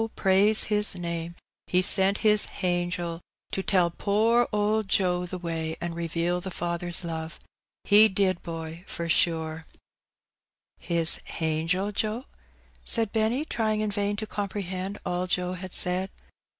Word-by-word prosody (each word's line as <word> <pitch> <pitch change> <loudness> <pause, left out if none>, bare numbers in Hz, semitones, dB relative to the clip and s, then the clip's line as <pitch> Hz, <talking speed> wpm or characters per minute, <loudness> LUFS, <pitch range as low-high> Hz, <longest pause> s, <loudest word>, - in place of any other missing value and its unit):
praise 200 +3 +4
His 210 -2 +4
name^ 170 -1 -5 0.3
He 180 0 +2
sent 195 +3 +4
His 210 -1 +6
hangel 175 -2 -3 0.3
to 195 - -2
tell 180 -3 +2
poor 225 +6 +2
owd 210 0 0
Joe 180 -2 +1
the 185 - -5
way, 165 -2 -4
an' 170 0 -4
reveal 170 +1 -2
the 190 - -5
Father's 175 0 -1
love 160 -1 -6 0.2
— - - -67
He 215 +2 +8
did, 190 -3 0
boy, 165 0 -7
for 170 - -5
sure/' 160 -1 0 1.1
"His 170 -1 +3
hangel, 165 +5 -1
Joe?" 215 +5 -2 0.6
said 225 -3 +1
Benny, 225 +6 0
trying 215 -6 -1
in 215 -1 -1
vain 205 0 -1
to 215 +1 -5
com 205 -2 -4
prehend 190 0 -5
all 180 0 -2
Joe 180 0 -1
had 185 0 -7
said. 180 +2 +1
185 Hz, 145 wpm, -26 LUFS, 170-205 Hz, 1.1 s, He